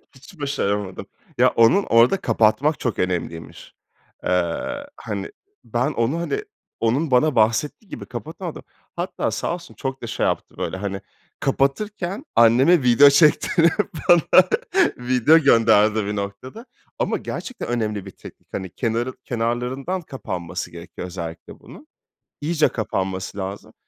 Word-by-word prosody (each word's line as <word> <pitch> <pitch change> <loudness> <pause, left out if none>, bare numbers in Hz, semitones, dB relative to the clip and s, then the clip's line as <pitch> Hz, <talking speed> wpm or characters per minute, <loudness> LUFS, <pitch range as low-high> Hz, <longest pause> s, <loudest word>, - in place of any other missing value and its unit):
Hiç 150 +6 -16
başaramadım. 105 -9 -2 0.3
Ya, - - +5
onu 115 +12 +4
orada 115 +11 +4
kapatmak 120 +4 +2
çok 115 -5 -2
önemliymiş. 85 -2 -4 0.5
Eee, 90 - -1
hani, - - -5 0.3
ben 125 +5 -1
onu, 125 +8 0
hani, 415 - -2 0.4
onun 130 +7 0
bana 130 +2 +3
bahsettiği 115 - +1
gibi - - -7
kapatamadım. - - -7 0.3
Hatta - - -2
sağ - - -2
olsun 175 -1 -9
çok 135 -1 -5
da - - -4
şey - - -1
yaptı. - - -2
Böyle, 95 - -3
hani, 100 -1 -4 0.4
kapatırken 190 - -1
anneme 130 +8 +5
video 125 +4 +7
çektirip 165 +2 +4 0.4
bana 175 -3 +6 0.5
video 125 +5 +4
gönderdi 110 -5 +4
bir 105 - -3
noktada 100 - -6 0.3
ama - - 0
gerçekten 255 -2 -6
önemli 105 -4 -2
bir 95 - -9
teknik. - - -14
Hani, 95 -1 -4
kenarı 115 +5 -2
kenarlarından 125 +9 -2
kapanması 90 - -6
gerekiyor 85 +1 -8
özellikle 85 -2 -8
bunun. - - -14 0.5
İyice 155 0 +2
kapanması 95 -3 -3
lazım. 95 +1 -6
120 Hz, 130 wpm, -22 LUFS, 105-150 Hz, 0.5 s, video